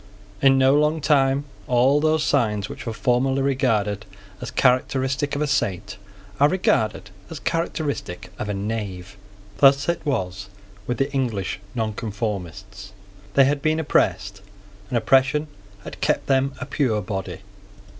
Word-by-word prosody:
In 135 -1 +5
no 135 0 +5
long 150 +2 +2
time 140 -2 +2 0.2
all 130 +3 +3
those 155 0 +2
signs 105 -9 +1
which - - -9
were - - -1
formerly 130 +4 +1
regarded 110 -7 0 0.3
as - - -5
characteristic 135 +2 +1
of 145 - 0
a - - +1
saint 105 -8 -1 0.4
are 145 +1 +5
regarded 110 - 0 0.2
as 160 - -7
characteristic 145 - -3
of 105 - -4
a - - -1
knave. 100 -3 -5 0.4
Thus 140 0 +5
it 170 - -1
was 100 - -3 0.4
with 125 - -1
the 135 +1 -1
English 115 -9 -2 0.2
Nonconformists. 105 -3 -4 0.4
They 135 - +7
had 140 +1 0
been 155 +1 +1
oppressed; 100 - 0 0.5
and 125 - 0
oppression 135 +5 +3 0.4
had - - -10
kept - - +1
them 135 0 +1
a - - -4
pure 130 -6 0
body. 95 0 -5
130 Hz, 140 wpm, -23 LUFS, 105-140 Hz, 0.5 s, They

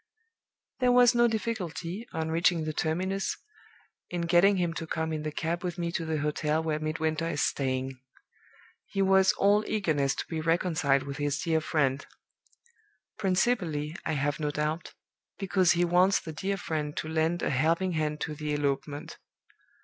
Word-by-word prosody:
"There 250 -1 +4
was 245 0 +6
no 240 0 +4
difficulty, 215 -3 -3
on 160 0 -2
reaching 170 0 +2
the 155 0 -3
terminus, 185 +6 -1 0.7
in 175 -1 -3
getting 175 +4 +4
him 175 -2 0
to 165 0 -5
come 160 0 -2
in 155 - -2
the 155 0 -3
cab 170 +3 -2
with 180 0 -3
me 170 -1 -2
to 170 -1 -2
the 160 -1 -1
hotel 150 +1 0
where 155 -1 -1
Midwinter 155 +1 -1
is 145 - 0
staying. 130 -1 -1 0.9
He 195 - 0
was 190 0 +5
all 205 +2 +3
eagerness 155 -10 +1
to - - -4
be 160 -2 -4
reconciled 160 -4 +2
with 140 -1 -6
his 145 -1 -1
dear 160 -2 +1
friend 140 -3 0 1.2
principally, 180 -6 0
I 160 - -1
have 145 +1 -1
no 150 -1 -1
doubt, 150 +3 -3 0.4
because 190 -3 +3
he 175 0 +2
wants 180 +3 +4
the 160 - -8
dear 195 +5 -2
friend 155 -4 -3
to - - -3
lend 160 +2 0
a - - +1
helping 165 +7 +1
hand 155 -2 -2
to 155 - -2
the 150 0 -3
elopement. 145 0 -3
160 Hz, 165 wpm, -28 LUFS, 150-185 Hz, 1.2 s, was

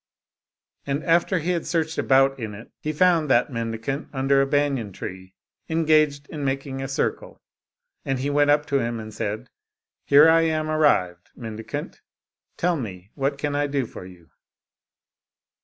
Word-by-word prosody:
And 140 +2 -1
after 170 +3 +2
he 170 +2 -1
had 170 -2 -2
searched 160 -1 -1
about 135 0 +3
in 110 -3 -5
it, 110 +4 -12
he 155 - -3
found 165 -1 +3
that 125 +2 +3
mendicant 115 +4 -4
under 135 0 +2
a 135 - +1
banyan 140 -7 0
tree, 95 0 -8 0.3
engaged 155 -3 +2
in 150 -2 -6
making 135 0 -2
a 135 - -3
circle, 140 - -3 0.6
and 135 -1 -1
he 140 +3 -2
went 145 0 +3
up 150 0 +3
to 140 -1 +1
him 115 -1 -2
and 110 0 -8
said, 110 +5 -4 0.3
" - - -61
Here 145 +3 +7
I 165 0 +5
am 155 -1 0
arrived, 90 - +1
mendicant; 110 -2 -7 0.6
tell 175 -1 +1
me, 100 -6 -7
what 140 0 -1
can 145 0 -2
I 145 0 +1
do 140 -2 -1
for 110 - -10
you? 90 -3 -17
140 Hz, 165 wpm, -24 LUFS, 115-155 Hz, 0.6 s, Here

